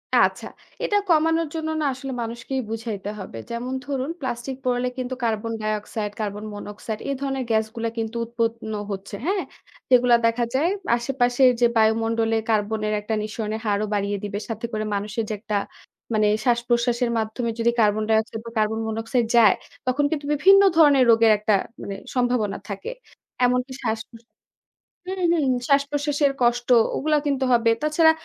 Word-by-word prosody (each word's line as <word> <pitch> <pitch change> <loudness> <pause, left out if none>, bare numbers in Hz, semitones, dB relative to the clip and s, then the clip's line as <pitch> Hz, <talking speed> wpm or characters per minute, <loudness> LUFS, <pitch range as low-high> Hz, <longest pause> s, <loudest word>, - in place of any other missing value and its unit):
আচ্ছা, - - +3 0.4
এটা 415 - +2
কমানোর 325 0 +3
জন্য 315 0 -2
না? - - 0
আসলে 265 +1 -6
মানুষকেই 235 +3 -4
বুঝাইতে 220 -3 -4
হবে। 185 -11 -8
যেমন 240 +2 -4
ধরুন, 275 0 -2
প্লাস্টিক 260 0 -4
পোড়ালে 250 0 0
কিন্তু 255 0 -3
carbon 225 0 -1
die 215 0 0
oxide, 210 0 -5
carbon 210 0 -4
monoxide, 210 +1 -6
এ - - +1
ধরনের 270 -2 -2
গ্যাসগুলা 220 +1 0
কিন্তু 225 +1 -3
উৎপন্ন 230 -1 -2 0.2
হচ্ছে। 195 +1 -6
হ্যাঁ? 385 +1 0 0.5
যেগুলা 245 -1 +6
দেখা 230 +1 +2
যায় 315 +6 +3 0.3
আশেপাশের 250 +1 +3
যে, - - +6
বায়ুমন্ডলে 225 +1 +2
কার্বনের 215 0 0
একটা 220 +2 -3
নিঃসরণের 215 0 -4
হারও 205 +1 +1
বাড়িয়ে 200 0 0
দিবে। 205 0 -3
সাথে 225 +1 -4
করে 215 0 -2
মানুষের 210 +3 -2
যে, - - -1
একটা 215 -1 -3 0.6
মানে 215 -1 +3 0.2
শ্বাসপ্রশ্বাসের 240 0 +1
মাধ্যমে 225 +2 -2
যদি 235 +1 +3
কার্বন 215 0 +3
ডাইঅক্সাইড 220 0 +1
বা 230 - -7
কার্বন 220 +1 +1
মনোক্সাইড 225 +2 -1
যায়, 215 -4 +7 0.3
তখন 265 +3 +2
কিন্তু 290 -2 -2
বিভিন্ন 390 +7 +6 0.2
ধরনের 285 -4 +6
রোগের 225 -1 +5
একটা 210 +1 +1 0.3
মানে 200 - -5 0.2
সম্ভাবনা 245 -5 +1
থাকে। 200 - -5 0.5
এমনকি 250 +1 0
শ্বাস-প্রস 225 +1 -4 0.8
হুম, 380 0 -4
হুম। 295 -6 +1 0.2
শ্বাসপ্রশ্বাসের 285 0 +2
কষ্ট 240 0 +2 0.3
ওগুলা 305 +1 +2
কিন্তু 270 -2 0
হবে। 230 -1 +4
তাছাড়া 320 +1 +4
235 Hz, 155 wpm, -23 LUFS, 220-265 Hz, 0.8 s, যায়